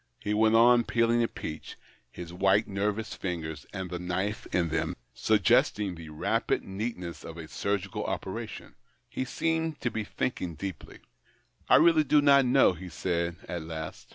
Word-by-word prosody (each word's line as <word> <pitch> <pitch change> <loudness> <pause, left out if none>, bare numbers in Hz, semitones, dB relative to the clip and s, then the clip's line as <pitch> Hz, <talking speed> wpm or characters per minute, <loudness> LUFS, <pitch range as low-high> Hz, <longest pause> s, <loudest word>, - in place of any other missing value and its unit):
He 105 - -2
went 110 +1 +4
on 120 +1 +6
peeling 115 0 +2
a 115 - +2
peach, 75 -7 -7 0.3
his 85 +6 -9
white 95 +4 +3
nervous 105 +3 -2
fingers 80 -5 -5
and 95 -3 -5
the 90 - -3
knife 95 +4 -2
in 85 -2 +1
them 80 0 -1 0.2
suggesting 110 0 +3
the 80 -1 -10
70 - - -11
THE - - -10
OCTAVE - - -10
OF - - -13
CLAUDIUS. - - -2
rapid - - +1
neatness 95 -5 -5
of 80 - -8
a 80 -1 -7
surgical 100 +2 -2
operation. - - -5 0.3
He 130 - -3
seemed 160 +3 -1
to 120 - -1
l^e 110 -2 -3
thinking 90 -9 -3
deeply. 95 0 -7 0.3
" - - -35
I - - +8
really 160 -1 +6
do 150 +1 +4
not 140 -2 +6
know," 125 -5 +5
he 90 +1 -9
said 85 0 -2
at 85 - -4
last. 80 -1 -7
100 Hz, 185 wpm, -28 LUFS, 85-120 Hz, 0.3 s, I